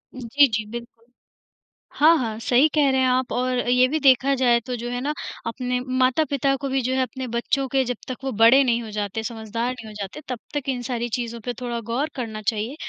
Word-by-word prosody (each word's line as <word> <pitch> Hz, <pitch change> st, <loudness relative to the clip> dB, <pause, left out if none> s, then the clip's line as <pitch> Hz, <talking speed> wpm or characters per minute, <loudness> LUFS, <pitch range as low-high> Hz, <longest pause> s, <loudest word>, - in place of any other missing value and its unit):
जी, 260 Hz, +3 st, +3 dB
जी, 220 Hz, -3 st, -2 dB
बिल्कुल। 235 Hz, -1 st, -9 dB, 0.9 s
हाँ, 315 Hz, +3 st, +7 dB
हाँ, 225 Hz, -5 st, -3 dB
सही 245 Hz, +5 st, +4 dB
कह 290 Hz, -2 st, +4 dB
रहे 265 Hz, 0 st, +2 dB
हैं 260 Hz, -, +3 dB
आप। 255 Hz, 0 st, 0 dB
और 255 Hz, 0 st, 0 dB
ये 250 Hz, +1 st, +5 dB
भी 310 Hz, +4 st, -1 dB
देखा 270 Hz, -1 st, +4 dB
जाए 245 Hz, -2 st, +3 dB
तो 250 Hz, -, -3 dB
जो 240 Hz, 0 st, -5 dB
है 245 Hz, 0 st, -3 dB
ना 290 Hz, +3 st, -1 dB, 0.3 s
अपने 250 Hz, +1 st, -2 dB, 0.2 s
माता-पिता 275 Hz, +1 st, +2 dB
को 275 Hz, -, -2 dB
भी 265 Hz, 0 st, +1 dB
जो 255 Hz, +1 st, -1 dB
है 260 Hz, -, +1 dB
अपने 255 Hz, +1 st, -4 dB
बच्चों 240 Hz, +3 st, -1 dB
के 265 Hz, +1 st, +1 dB
जब 250 Hz, -1 st, -3 dB
तक 255 Hz, -, -4 dB
वो 270 Hz, -, -2 dB
बड़े 230 Hz, +5 st, +6 dB
नहीं 240 Hz, -2 st, +1 dB
हो 220 Hz, -, -8 dB
जाते, 210 Hz, +1 st, -3 dB
समझदार 230 Hz, +1 st, -3 dB
नहीं 235 Hz, -3 st, -10 dB
हो 215 Hz, -, -10 dB
जाते 200 Hz, +10 st, -6 dB
तब 250 Hz, -3 st, -3 dB
तक 290 Hz, -2 st, -3 dB
इन 250 Hz, -2 st, -1 dB
सारी 240 Hz, -1 st, -2 dB
चीज़ों 235 Hz, -1 st, -4 dB
पे 245 Hz, -, -2 dB
थोड़ा 240 Hz, -1 st, -3 dB
गौर 280 Hz, +6 st, 0 dB
करना 225 Hz, -5 st, -5 dB
चाहिए। 220 Hz, +4 st, -2 dB
250 Hz, 230 wpm, -23 LUFS, 235-265 Hz, 0.9 s, हाँ